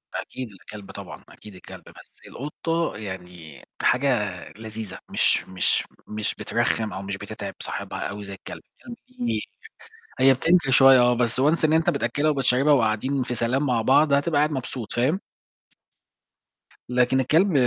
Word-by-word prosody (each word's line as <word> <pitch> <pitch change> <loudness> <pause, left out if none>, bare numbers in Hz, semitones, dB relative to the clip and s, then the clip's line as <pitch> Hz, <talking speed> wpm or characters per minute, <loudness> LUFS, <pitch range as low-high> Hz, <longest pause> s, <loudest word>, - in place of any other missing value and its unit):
أكيد 125 -4 -6
الكلب 100 +1 -11
طبعًا، - - -9
أكيد 105 -3 -14
الكلب 90 - -12
بس، - - -16
القُطة 165 +1 -3
يعني 90 -7 -9 0.2
حاجة 125 -6 +2 0.3
لذيذة، 110 -2 -7
مش - - +2
مش 95 -1 +1 0.2
مش 105 0 -3
بترخِم 110 -1 -1
أو 95 - -5
مش 100 0 -5
بتتعب 100 -1 -7
صاحبها - - -5
أوي 105 0 -7
زي 100 0 -7
الكلب، 95 - -9 0.2
الكلب 240 -1 -10 0.2
بي 240 -1 -1 0.8
هي 135 +1 +7
بتنكر 165 +1 +2
شوية 135 0 +7
آه، 120 0 +5
بس 120 +1 +1
Once 155 +3 +2
إن 155 - +2
أنت 160 0 +3
بتأكلها 145 +6 0
وبتشربها 135 +1 +3
وقاعدين 130 +2 +1
في 125 - -4
سلام 125 +5 0
مع 120 -4 +1
بعض، 140 +5 +4
هتبقى 145 +2 +2
قاعد 150 +1 +2
مبسوط، 125 -4 -5
فاهم؟ 140 +11 +1 1.7
لكن 125 +1 +2
الكلب 165 +9 +3
125 Hz, 150 wpm, -24 LUFS, 105-140 Hz, 1.7 s, هي